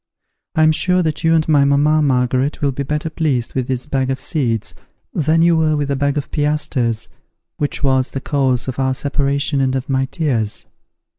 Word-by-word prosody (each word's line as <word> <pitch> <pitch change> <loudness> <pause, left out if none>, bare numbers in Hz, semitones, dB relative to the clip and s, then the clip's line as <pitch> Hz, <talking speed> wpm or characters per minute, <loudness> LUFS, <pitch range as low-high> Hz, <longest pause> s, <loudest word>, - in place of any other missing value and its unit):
I 155 - +4
am 155 - +5
sure 180 +3 +2
that 160 0 -2
you 165 0 +4
and 160 -1 +1
my 145 -3 +4
mamma 145 +2 +3
Margaret 130 0 +1
will 140 -1 +1
be 135 - -5
better 150 +3 -2
pleased 150 -7 -1
with 130 -2 -2
this 130 -1 -2
bag 135 -3 -1
of 135 - -2
seeds, 115 - -2 0.4
than 160 +2 +2
you 170 0 +4
were 155 -1 +2
with 145 -1 -2
the 140 - 0
bag 140 +1 0
of 145 - -4
piastres, 145 -6 0 0.5
which 145 0 -3
was 130 -1 +2
the 135 - -4
cause 135 -3 0
of 130 0 -4
our 130 0 +1
separation 140 +1 0
and 130 0 +1
of 130 +1 -4
my 135 0 +1
tears. 120 -8 -2
140 Hz, 200 wpm, -18 LUFS, 130-155 Hz, 0.5 s, am